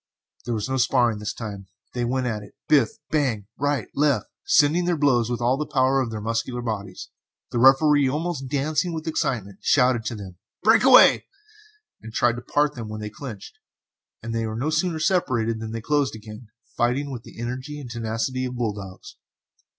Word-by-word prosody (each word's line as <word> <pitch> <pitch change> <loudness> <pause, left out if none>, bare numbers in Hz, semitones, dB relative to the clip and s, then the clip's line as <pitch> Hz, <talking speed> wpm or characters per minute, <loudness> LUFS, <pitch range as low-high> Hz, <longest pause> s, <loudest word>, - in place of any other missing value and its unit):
There 120 - -1
was 105 +1 -2
no 130 0 -1
sparring 120 -3 +2
this 105 - -3
time 100 -4 -7 0.3
they 120 - -2
went 130 +2 -1
at 110 -4 -2
it 100 - -14
biff, 140 -7 +4 0.2
bang, 130 -10 0
right 145 -3 0
and - - -18
left, 145 -1 +1
sending 150 +3 +4
in 175 - -1
their 175 -2 +1
blows 125 -6 +2
with 120 -1 -2
all 125 +3 +2
the 150 0 -3
power 135 0 +3
of 125 - -2
their 110 -1 -5
muscular 115 +3 -2
bodies. 100 -5 -5 0.4
The 120 - -1
Referee, 135 +2 +5
almost 150 -1 -3
dancing 155 +5 -1
with 160 -1 -5
excitement, 110 - -2
shouted 125 -4 +3
to 115 - -3
them 100 -3 -8
to 90 - -32 0.2
"break 220 +4 +5
away," 260 -1 +7 0.7
and 110 - -9
tried 120 +1 +1
to - - -6
part 145 +4 +1
them 115 -3 -7
when 110 0 -6
they 105 0 -6
clinched, 110 -4 -9 0.6
but 115 - -5
they 115 0 -1
were 110 - -4
no 145 +6 -1
sooner 160 +1 0
separated 130 -10 +1
than 110 0 -6
they 115 0 -4
closed 145 -1 0
again, 110 +1 -11 0.3
fighting 130 +4 0
with 125 -3 -6
the - - -14
energy 130 +5 -5
and 125 -4 -8
tenacity 115 +3 -2
of 125 0 -5
bull 115 -4 -1
dogs. 95 -2 -10
125 Hz, 200 wpm, -24 LUFS, 110-145 Hz, 0.7 s, away